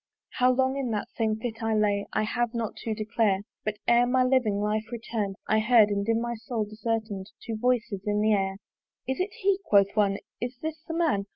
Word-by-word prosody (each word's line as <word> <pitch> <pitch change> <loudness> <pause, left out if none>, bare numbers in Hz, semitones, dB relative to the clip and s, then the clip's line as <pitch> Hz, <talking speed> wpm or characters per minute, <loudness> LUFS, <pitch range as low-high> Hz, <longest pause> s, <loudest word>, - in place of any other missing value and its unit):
How 250 0 +5
long 260 +1 +1
in 265 -3 -2
that 210 -2 -3
same 220 -2 0
fit 225 -1 -5
I 225 -1 +1
lay, 205 -1 +1
I - - +1
have 240 +2 -1
not 230 -2 -2
to 220 -1 -3
declare; 215 -2 +1 0.2
But 215 -1 -2
ere 240 +1 +5
my 255 +1 +3
living 250 -6 +2
life 210 +1 0
return'd, 225 -4 -3
I 215 - +3
heard 215 -1 +5
and 200 +1 -1
in 225 0 +3
my 235 0 -2
soul 225 -1 -3
discern'd 220 +1 -2 0.4
Two 230 -2 -3
voices 230 -3 0
in 210 0 +1
the 215 +1 +3
air, 195 -1 0 0.5
"Is 265 +4 -2
it 370 +3 0
he?" 390 0 +1
quoth 200 - +3
one, 200 -2 +3 0.2
"Is 245 +1 -4
this 315 0 -5
the 325 - -3
man? 300 -13 +1
225 Hz, 210 wpm, -27 LUFS, 210-245 Hz, 0.5 s, How